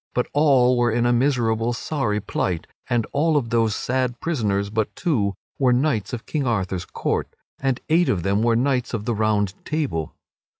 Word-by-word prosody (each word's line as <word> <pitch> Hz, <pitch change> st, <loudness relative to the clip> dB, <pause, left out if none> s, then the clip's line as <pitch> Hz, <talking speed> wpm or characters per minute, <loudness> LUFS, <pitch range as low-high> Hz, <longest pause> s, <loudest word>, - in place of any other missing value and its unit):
But 125 Hz, -, +2 dB
all 130 Hz, -4 st, +4 dB
were 120 Hz, 0 st, +3 dB
in 120 Hz, +2 st, +1 dB
a 120 Hz, -, +3 dB
miserable 120 Hz, -3 st, +1 dB
sorry 115 Hz, -4 st, -1 dB
plight; 90 Hz, -4 st, -2 dB, 0.2 s
and 120 Hz, -2 st, +1 dB
all 155 Hz, +2 st, +2 dB
of 120 Hz, -5 st, -2 dB
those 115 Hz, -3 st, +2 dB
sad 125 Hz, -1 st, -1 dB
prisoners 105 Hz, -11 st, -1 dB
but 110 Hz, -1 st, -1 dB
two 105 Hz, -, 0 dB, 0.2 s
were 130 Hz, -3 st, +4 dB
knights 125 Hz, -5 st, 0 dB
of 120 Hz, -3 st, -5 dB
King 145 Hz, -4 st, -2 dB
Arthur's 95 Hz, -5 st, -1 dB
court, -, -, -2 dB, 0.3 s
and 135 Hz, -2 st, 0 dB
eight 170 Hz, +2 st, +3 dB
of 90 Hz, -4 st, 0 dB
them 100 Hz, +2 st, +1 dB
were 115 Hz, 0 st, +3 dB
knights 125 Hz, 0 st, 0 dB
of 105 Hz, -2 st, -4 dB
the 120 Hz, -, 0 dB
Round 105 Hz, -3 st, +1 dB
Table. 140 Hz, -, -2 dB
120 Hz, 180 wpm, -23 LUFS, 105-135 Hz, 0.3 s, all